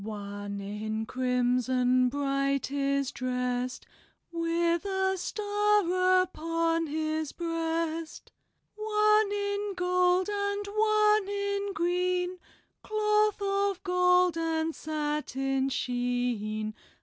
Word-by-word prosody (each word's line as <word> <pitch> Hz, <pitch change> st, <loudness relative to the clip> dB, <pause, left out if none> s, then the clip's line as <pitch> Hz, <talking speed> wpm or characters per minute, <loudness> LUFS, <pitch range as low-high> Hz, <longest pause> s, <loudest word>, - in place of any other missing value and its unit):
"One 205 Hz, -1 st, -6 dB
in 215 Hz, +2 st, -4 dB
crimson 250 Hz, 0 st, +1 dB
bright 275 Hz, 0 st, -1 dB
is 275 Hz, -1 st, 0 dB
drest, 250 Hz, 0 st, -2 dB, 0.5 s
With 335 Hz, 0 st, 0 dB
a 385 Hz, -1 st, 0 dB
star 390 Hz, -2 st, +2 dB
upon 330 Hz, -1 st, -1 dB
his 310 Hz, 0 st, -2 dB
breast. 330 Hz, -1 st, -3 dB, 0.4 s
One 425 Hz, 0 st, +2 dB
in 405 Hz, 0 st, -2 dB
gold 360 Hz, 0 st, +2 dB
and 405 Hz, 0 st, -2 dB
one 425 Hz, 0 st, +3 dB
in 400 Hz, 0 st, -2 dB
green, 360 Hz, +1 st, 0 dB, 0.4 s
Cloth 425 Hz, -1 st, +1 dB
of 395 Hz, -1 st, 0 dB
gold 360 Hz, -2 st, +3 dB
and 325 Hz, 0 st, -1 dB
satin 295 Hz, -3 st, -2 dB
sheen. 245 Hz, -4 st, -2 dB
330 Hz, 90 wpm, -29 LUFS, 260-400 Hz, 0.5 s, one